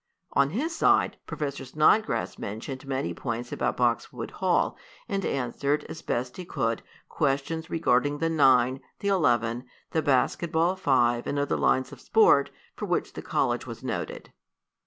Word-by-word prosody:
On 140 0 +3
his 300 - -2
side, - - +3
Professor 140 -2 -4
Snodgrass 155 - +2
mentioned 130 +6 -6
many 135 0 -2
points 120 -1 -4
about 120 +1 -1
Boxwood 120 -2 -1
Hall, - - +1 0.3
and 195 -1 -2
answered, 140 +2 -1
as 160 - -7
best 125 +1 -3
he 185 - -5
could, 115 -9 -1 0.3
questions 155 +3 -1
regarding 145 -3 +2
the 165 - 0
nine, 130 -5 +4 0.2
the 200 - -2
eleven, 120 - +1 0.3
the 160 - +1
basket 145 +4 +1
ball 170 +3 +2
five 120 -8 +2
and 145 - -1
other 145 0 0
lines 130 0 +1
of - - -11
sport, 180 -11 +4 0.3
for - - -5
which - - -1
the - - -6
college - - -1
was - - -8
noted. - - -4
140 Hz, 155 wpm, -27 LUFS, 125-160 Hz, 0.3 s, nine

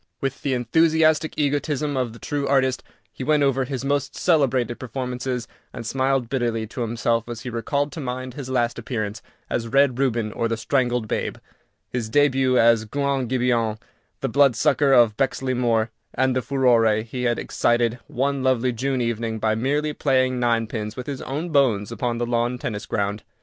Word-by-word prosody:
With 135 0 -3
the 135 -2 0
enthusiastic 160 +5 +2
egotism 145 0 0
of 125 -3 -1
the 115 - -12
true 140 +3 -3
artist, 130 -2 +2 0.3
he - - -7
went 150 +1 +3
over 135 -1 +2
his 130 0 -4
most 140 -1 -1
celebrated 130 -8 +1
performances, 125 0 -4 0.2
and 120 -2 -7
smiled 130 0 0
bitterly 115 -3 -1
to 125 - -6
himself 115 0 0
as 120 -1 -6
he 125 -1 -6
recalled 140 +5 -1
to - - -7
mind 130 -2 -4
his 130 -1 -7
last 120 -2 0
appearance 110 -2 -4 0.3
as 115 -1 -2
"Red 135 0 +3
Reuben, 120 -5 0
or 115 - -1
the 115 0 -2
Strangled 120 0 0
Babe," - - -2 0.5
his 120 -3 -3
début 130 -1 +3
as 115 -1 +4
"Guant 140 +1 -1
Gibeon, 120 -3 +1 0.4
the - - 0
Blood 135 0 +4
sucker 140 +4 +3
of 120 -5 +5
Bexley 135 -1 0
Moor," 115 -2 +1 0.2
and 130 0 +2
the 130 - +1
furore 115 -5 +3
he 125 +2 -4
had 120 -1 +1
excited 120 0 +1
one 140 +2 -1
lovely 130 -1 +1
June 130 +2 -1
evening 115 -1 -2
by 110 0 +1
merely 145 +6 0
playing 130 -3 +1
ninepins 115 -2 -1
with 125 - -6
his 140 -2 -5
own 155 +6 -4
bones 125 -10 +2
upon 120 -1 -2
the 120 - -1
lawn 120 +1 0
tennis 110 -3 -5
ground. 105 0 -1
125 Hz, 175 wpm, -23 LUFS, 115-135 Hz, 0.5 s, of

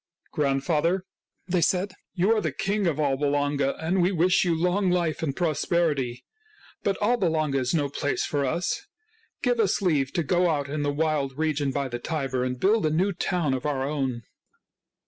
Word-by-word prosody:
" - - -38
Grandfather," 155 +5 +1 0.4
they 180 -1 +1
said, 185 +3 +1
" - - -61
you 190 +4 +2
are 215 - +1
the - - -1
king 200 0 -1
of 155 -4 0
Alba 145 -1 +1
Longa 145 -1 +1
and 175 +4 0
we 180 +2 +3
wish 180 0 +3
you 170 -3 +1
long 180 +3 +2
life 170 -4 0
and 140 -4 -2
pros 160 -4 0
perity. 140 -8 0 0.6
But 195 -1 -1
Alba 230 -2 +2
Longa 155 -4 +1
is 130 +4 0
no 145 -3 +1
place 145 +1 -1
for 145 -1 -1
us. 175 - -2 0.6
Give 245 -2 +1
us 205 -4 +2
leave 150 -9 +1
to 170 - 0
go 175 +4 +2
out 145 -3 0
in 145 +1 -3
the 145 0 0
wild 145 -3 -1
region 155 -3 0
by 140 0 -1
the 120 -1 -5
Tiber 135 -3 -2
and 125 0 -3
build 205 - +3
a - - +2
new 185 +6 +1
town 170 -5 0
of 130 - -2
our 140 -3 -1
own." 135 -5 -2
155 Hz, 200 wpm, -26 LUFS, 140-180 Hz, 0.6 s, we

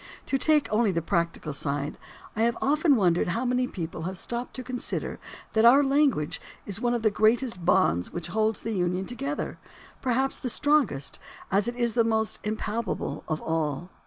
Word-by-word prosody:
To 270 - 0
take 305 +1 +3
only 220 0 +3
the 170 - 0
practical 170 -3 -1
side, 140 +1 -2 0.4
I 220 - -1
have 235 +1 +2
often 295 +1 +3
wondered 180 -6 +2
how 230 +8 -1
many 250 0 +1
people 165 -5 -5
have 190 - -6
stopped 240 +6 -4
to 255 - -5
consider 250 -1 -3 0.3
that 220 - +3
our 260 +5 +7
language 275 - +2 0.2
is 200 +1 -2
one 240 0 +1
of 235 - -3
the 215 - +4
greatest 220 -2 +2
bonds 90 - +2
which 175 -1 -4
hold 220 +3 +1
the 225 - -5
Union 180 0 0
together, 275 +6 -4 0.4
perhaps 265 +1 0
the 250 - -3
strongest, 270 - +1 0.3
as 200 +2 +2
it 240 - -2
is 240 -2 +1
the 230 - +4
most 220 -1 0
impalpable 215 +2 -3
of 155 -1 -2
all. 160 +2 -2
220 Hz, 180 wpm, -27 LUFS, 175-250 Hz, 0.4 s, our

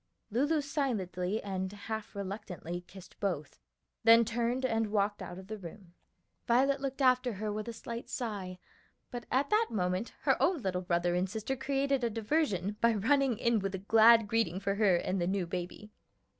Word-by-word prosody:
Lulu 290 +7 +2
silently 220 - -2
and 190 -1 -3
half 210 +1 -6
reluctantly 190 -3 -5
kissed 190 -1 -14
both, 170 -8 -3 0.4
then 230 +1 +7
turned 240 +3 -1
and 225 -3 +1
walked 205 -1 0
out 180 -1 -7
of 190 - -9
the 215 +2 -7
room. 180 0 -11 0.5
Violet 270 +3 +3
looked 275 0 -2
after 255 -1 +3
her 210 +1 -3
with 215 +1 -4
a - - -3
slight 235 +1 -7
sigh, 200 -6 -4 0.5
but 245 -1 -6
at 275 +2 +1
that 440 +2 +4
moment 185 +1 -1
her - - +2
own 345 -9 +2
little 180 -1 -1
brother 175 -1 0
and 180 +2 0
sister 220 +6 -3
created 275 0 0
a 235 - +2
diversion 210 - -1
by 230 -1 +4
running 260 +3 +2
in 235 0 +2
with 195 0 -3
a - - -2
glad 225 +3 +6
greeting 205 -5 0
for 200 0 -1
her 200 -3 +3
and 185 +2 -1
the 175 - 0
new 190 -1 0
baby. 180 +4 -6
215 Hz, 180 wpm, -31 LUFS, 190-245 Hz, 0.5 s, then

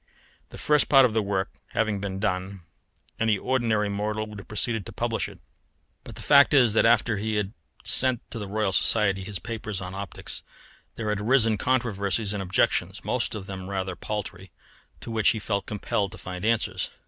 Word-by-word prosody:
The - - -11
first 150 -1 +2
part 135 -2 +7
of 115 - 0
the 110 - +2
work 100 -1 -1 0.2
having 110 -3 0
been 95 -1 -3
done, 95 -1 -2 0.6
any 110 -2 +2
ordinary 115 -3 +1
mortal 105 +2 -2
would 105 -1 -9
have 95 - -12
proceeded 110 0 -1
to - - -7
publish - - -2
it; - - -13 0.7
but - - -10
the - - -9
fact 140 0 +6
is 120 -6 +5
that 115 - +4
after 115 -1 +3
he 110 +2 -2
had 105 0 -1 0.3
sent 130 -2 +4
to 115 - -3
the 105 - -5
Royal 105 -1 -1
Society 100 -2 +3
his 100 0 -5
papers 110 +1 -5
on 95 -1 -6
optics, 100 +1 -5 0.5
there 110 -2 -3
had 105 -1 -1
arisen 115 -1 +4
controversies 105 -3 0
and 100 - -3
objections; 95 +1 0
most 125 -2 -1
of 100 -3 -6
them 95 -1 -7
rather 95 -2 -3
paltry, 95 -1 -5 0.5
to - - -7
which 110 -2 +3
he - - +1
felt 100 -1 -2
compelled 100 -1 -2
to - - -9
find 90 +1 -6
answers. 115 0 0
105 Hz, 190 wpm, -26 LUFS, 100-115 Hz, 0.7 s, part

